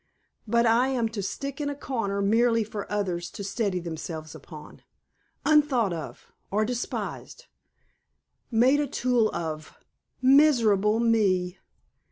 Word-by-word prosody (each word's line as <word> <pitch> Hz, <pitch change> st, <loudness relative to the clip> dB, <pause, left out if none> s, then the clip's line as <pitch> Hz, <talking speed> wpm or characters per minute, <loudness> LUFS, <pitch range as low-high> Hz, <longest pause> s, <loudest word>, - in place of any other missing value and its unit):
But 235 Hz, +2 st, +2 dB
I 235 Hz, +3 st, +3 dB
am 245 Hz, -4 st, 0 dB
to 220 Hz, -2 st, -5 dB
stick 275 Hz, +8 st, -5 dB
in 285 Hz, -, -1 dB
a 285 Hz, -, -4 dB
corner 215 Hz, -8 st, -2 dB
merely 230 Hz, +2 st, +3 dB
for 210 Hz, -1 st, -7 dB
others 180 Hz, -4 st, -2 dB
to 205 Hz, -, -8 dB
steady 200 Hz, -1 st, -1 dB
themselves 160 Hz, -2 st, -6 dB
upon 155 Hz, 0 st, -12 dB, 0.6 s
unthought 285 Hz, -, +3 dB
of 160 Hz, -4 st, -8 dB, 0.2 s
or 215 Hz, +2 st, +1 dB
despised, 250 Hz, -, -5 dB, 1.0 s
made 255 Hz, +4 st, +3 dB
a 295 Hz, -, 0 dB
tool 245 Hz, -3 st, +1 dB
of 155 Hz, -2 st, -5 dB, 0.4 s
Miserable 235 Hz, -7 st, +4 dB
me!" 195 Hz, -6 st, +1 dB
220 Hz, 125 wpm, -26 LUFS, 190-250 Hz, 1.0 s, Miserable